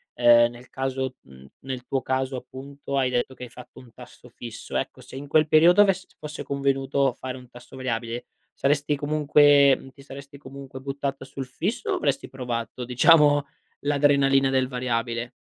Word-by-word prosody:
ehm, 120 -1 +5
nel 120 +1 -14
caso, 130 -1 -3
mhmm, 65 0 -16 0.2
nel 130 -2 -6
tuo 135 0 -2
caso 130 +1 -2
appunto, 140 +2 -7
hai 130 -2 +2
detto 125 +1 -1
che - - -10
hai 125 - -8
fatto 125 +1 -13
un 125 -2 -16
tasso 125 0 -15
fisso. 115 -1 -9
Ecco, - - -4
se - - -13
in 140 +2 -7
quel 155 +1 +3
periodo 170 +6 +6
avess 190 -2 +2
fosse 150 -1 -7
convenuto 140 -1 0
fare 130 +1 -7
un 125 -1 -14
tasso 125 +1 -14
variabile, 120 -2 -4 0.3
saresti 145 +1 0
comunque 145 -2 +4
ti 140 - -17
saresti 140 0 -11
comunque 135 -1 -10
buttata 135 0 -4
sul 135 0 -7
fisso 200 - -3
o - - +1
avresti 315 - -1
provato 125 -1 -5
diciamo 145 +3 +5 0.4
l'adrenalina 140 -2 +3
del 130 -1 +1
variabile? 120 -2 -3
135 Hz, 165 wpm, -24 LUFS, 125-140 Hz, 0.4 s, periodo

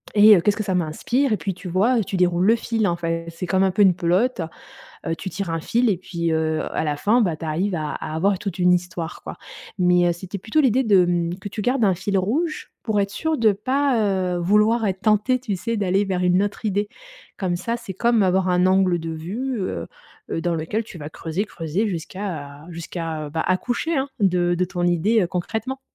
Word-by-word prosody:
et 210 +1 +8
heu, 175 - +3
qu'est-ce 205 +3 +1
que 215 - -1
ça 190 -2 -1
m'inspire?» 220 - 0
Et 215 - +1
puis, 195 -3 -3
tu 185 - -9
vois, 205 +8 +2
heu, 225 - +2
tu 195 - -5
déroules 180 0 +2
le 225 +3 +5
fil, 225 -1 -1
en 170 - +1
fait, 165 -1 -3
c'est 170 +2 -6
comme 190 +1 +2
un 190 - +3
peu 200 +3 +1
une 190 -3 +6
pelote, 185 +7 +1 0.7
heu, 165 - 0
tu 190 +3 -6
tires 195 +1 -4
un 165 0 -2
fil 235 +8 +1
et 200 - +2
puis, 170 -2 -3
heu, 160 -1 0
à - - 0
la 150 -1 -1
fin, 230 +9 +3
bah, 175 -7 0
tu 160 - -7
arrives 180 +5 -1
à 155 -2 -2
à 155 - -5
avoir 190 +4 +1
toute 195 -2 -5
une 180 0 +5
histoire, 175 -2 -4
quoi - - -7 0.4
mais 180 -1 +4
heu, 175 - +2
c'était 190 +3 -7
plutôt 225 +11 +1
l'idée 260 -2 +3
de, 195 -5 +5
hem, 175 0 -1
que 200 - -7
tu 210 +1 -5
gardes 250 0 +1
un 190 - +3
fil 195 +2 -1
rouge 300 - -1
pour 215 -3 0
être 200 0 -1
sûre 320 +8 -1
de 220 -2 +4
pas, 265 +6 0 0.4
heu, - - -1
vouloir 210 +5 +3
être 190 -1 -2
tentée, 215 +4 +2
tu 215 -6 -3
sais, 230 +4 -2
d'aller 195 0 +1
vers 185 -2 -1
une 180 +2 +3
autre 205 +2 -3
idée. 205 0 0 0.5
Comme 180 -3 -1
ça, 230 +6 -2
c'est 200 -5 -8
comme 235 +2 +2
avoir 190 0 +2
un 180 0 +3
angle 185 -2 +3
de 165 0 -5
vue, 215 +11 -4
heu 85 - -3 0.4
heu, - - -1
dans 175 -1 0
lequel 165 +8 -2
tu 185 - -11
vas 150 -1 -6
creuser, 165 +6 -3
creuser 175 +2 -2
jusqu'à 165 -5 -6
jusqu'à, 165 -2 -5
bah, 160 - -2
accoucher, 245 - 0
hein, 270 +1 0
de 175 -3 +2
de 180 +1 +1
ton 180 0 -4
idée, 180 +6 +2
heu, - - +1
concrètement. 220 +9 -3
190 Hz, 235 wpm, -22 LUFS, 175-215 Hz, 0.7 s, et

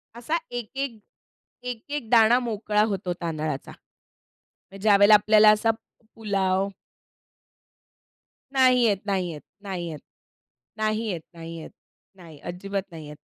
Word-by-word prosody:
असा 245 +8 -1
एक, 240 -3 -5
एक 270 -5 -3 0.6
एक, 245 -3 -5
एक 290 -6 -4
दाणा 230 0 +6
मोकळा 210 -1 0
होतो 185 -2 -2
तांदळाचा. 155 -4 -3
म्हणजे 195 0 -21
ज्यावेळेला 205 0 +6
आपल्याला 215 +1 +6
असा 225 +2 +1 0.4
पुलाव 195 -3 0 1.9
नाही 255 -2 +5
येत, 210 -4 +3
नाही 190 -3 -1
येत, 150 -2 -9 0.2
नाही 185 -4 -4
येत, 155 -3 -7 0.9
नाही 215 +1 0
येत, 175 -6 -3
नाही 165 0 -8
येत, 160 - -9 0.4
नाही. 165 -5 -14
अजिबात 195 +3 -4
नाही 160 -2 -9
येत. 150 0 -10
200 Hz, 125 wpm, -25 LUFS, 175-225 Hz, 1.9 s, दाणा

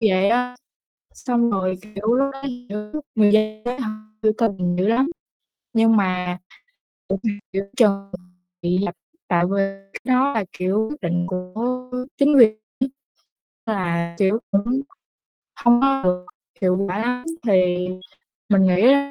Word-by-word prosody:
vậy 195 -3 +3
á. 250 +1 +1 0.6
Xong 235 -2 +1
rồi, 185 -1 0
kiểu, 215 0 -7
lúc 275 +2 +2
đó, 270 0 -10 0.3
kiểu, 210 +8 -5
người 210 -2 +5
dân 215 0 +2
ấy, 250 +2 -3
họ 230 -4 -2 0.3
biểu 215 - +4
tình 190 -6 0
dữ 190 +3 +1
lắm, 250 +5 +3 0.7
nhưng 225 -1 +4
mà 180 -2 0 0.7
biểu 195 - -1
tình 210 -3 -1
giữa 195 +1 -1
chừng 195 -4 +3 0.5
bị 175 +1 +1
dập, 175 - -3 0.3
tại 175 -2 +3
vì 195 +2 -1 0.4
cái - - -7 0.2
đó 275 +2 +3
là, 220 -6 0
kiểu, 195 +4 +1
quyết 300 - -7
định 175 -1 -1
của 225 +8 -4 0.3
chính 285 +1 +5
quyền 220 -4 +7 0.2
ấy, 260 - 0 0.8
là, 170 -5 -1
kiểu, 200 +3 +3
cũng 200 0 +2
hổng 255 +4 -1 0.8
hông 240 0 +6
có 270 0 +3
được 180 0 +1 0.4
hiệu 185 -1 +3
quả 185 - -2
lắm, 250 +2 -1 0.2
thì 180 -3 +3 0.6
mình 200 -2 +5
nghĩ 185 +1 +3
nó 280 +3 +5
210 Hz, 155 wpm, -22 LUFS, 185-240 Hz, 0.8 s, quyền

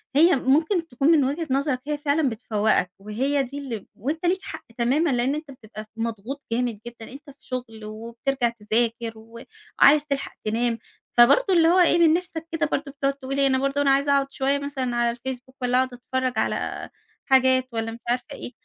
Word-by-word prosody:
هي 330 +4 +6
ممكن 315 +7 +1
تكون 270 +1 -1
من 310 -4 +5
وجهة 305 +5 -2
نظرك 270 -1 0
هي 300 - -1
فعلًا 290 0 +1
بتفوقك 215 -5 0
وهي 260 +8 -1
دي 265 +2 -7
إللّي 265 -6 -5
ب - - -23
وأنت 305 - -3
ليك 365 +2 +2
حق - - -8
تمامًا؛ 270 +8 +2
لأن 250 +3 +1
أنت 305 -2 -7
بتبقى 215 -4 -10
ف 215 - -21
مضغوط 230 +4 -4
جامد 235 -2 -1
جدًا، 235 -1 -10
أنت 285 +3 -12
في 275 - -14
شغل 230 -4 -7
وبترجع 235 +4 -2
تذاكر 230 +1 -1
وعايز 295 - +1
تلحق 280 -1 -3
تنام، 230 +2 0 0.4
فبرضه 325 - +6
إللّي 330 -2 +5
هو 355 +3 +5
إيه 350 -1 +5
من 325 -2 +6
نِفسك 335 -2 -3
كده 325 -1 0
برضو 280 0 -2
بتقعد 275 0 -1
تقول 275 0 -5
إيه؟ 275 - +4
أنا 260 -1 +2
برضو 275 +1 0
أنا 275 - +4
عايز 280 +1 +2
أقعد 275 -1 +2
شويّة 275 +1 0
مثلًا 270 -4 -3
على 235 0 +1
الFcebook 260 +1 -7
والّا 250 0 +2
أقعد 260 0 +1
أتفرّج 255 +1 -2
على - - -2 0.4
حاجات 260 -1 +4
والّا 225 0 -2
مش 230 - -9
عارفة 245 +1 0
إيه، - - -7
265 Hz, 195 wpm, -24 LUFS, 235-285 Hz, 0.4 s, هي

